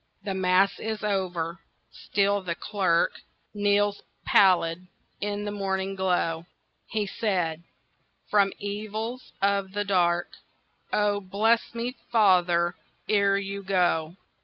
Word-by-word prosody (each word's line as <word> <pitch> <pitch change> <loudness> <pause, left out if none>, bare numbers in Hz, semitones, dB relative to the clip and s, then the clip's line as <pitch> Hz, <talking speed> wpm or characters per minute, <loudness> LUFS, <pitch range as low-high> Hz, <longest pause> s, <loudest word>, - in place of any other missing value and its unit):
The 195 - -3
Mass 190 +1 +2
is 220 -1 -4
over—still 190 +1 -2
the 175 -3 -3
clerk 185 -5 0 0.3
Kneels 205 0 +1 0.2
pallid 180 -2 +4 0.3
in 205 0 -3
the 205 - -3
morning 195 -1 -2
glow. 175 -3 0 0.4
He 215 -2 -1
said, 180 -6 -1 0.7
"From 200 -2 +3
evils 215 +4 -5
of 200 -1 +1
the 205 0 -1
dark 175 -3 +1 0.5
Oh, 205 -1 +2
bless 220 +5 +1
me, 240 +2 -3 0.2
father, 180 -5 +4 0.3
ere 200 -2 +3
you 200 0 -4
go. 180 -3 0
195 Hz, 110 wpm, -26 LUFS, 180-205 Hz, 0.7 s, pallid